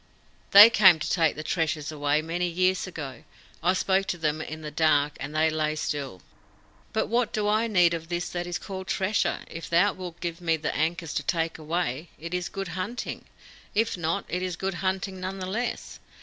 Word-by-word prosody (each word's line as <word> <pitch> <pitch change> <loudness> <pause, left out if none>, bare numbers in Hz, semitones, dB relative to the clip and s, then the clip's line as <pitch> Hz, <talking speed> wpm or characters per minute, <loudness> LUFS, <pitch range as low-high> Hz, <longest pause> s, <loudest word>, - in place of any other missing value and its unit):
"They 205 +3 +10
came 190 -6 +7
to 150 - -4
take 165 -4 +2
the 155 - -6
treasure 155 -2 -1
away 145 +1 +1
many 175 +2 -1
years 185 +2 +1
ago. 140 -9 -7 0.4
I 180 +2 +3
spoke 190 +1 +1
to 175 - -2
them 155 -1 -1
in 155 0 -7
the 150 - -5
dark, 150 -2 +2
and 145 +2 -6
they 160 +1 +3
lay 155 -1 0
still." 140 - -4 0.7
"But 220 - 0
what 235 +1 0
do 210 -1 -1
I 215 +2 +2
need 180 -6 +4
of 165 -1 -5
this 175 0 -2
that 175 0 -4
is 175 - -2
called 190 -1 -7
treasure? 195 +3 0
If 165 - -8
thou 175 +4 +4
wilt 180 -2 -8
give 170 0 -4
me 165 -2 +1
the 155 0 -3
ankus 165 +1 -1
to - - 0
take 165 -2 -1
away, 160 -1 -2
it 170 +3 -7
is 180 -1 -2
good 195 -2 -5
hunting. 190 +8 -5 0.5
If 225 +2 +2
not, 165 -2 -2
it 180 - -2
is 185 -2 -2
good 190 +2 -3
hunting 190 0 -2
none 185 +1 -4
the 185 - -4
less. 225 +6 -4
175 Hz, 205 wpm, -26 LUFS, 155-190 Hz, 0.7 s, They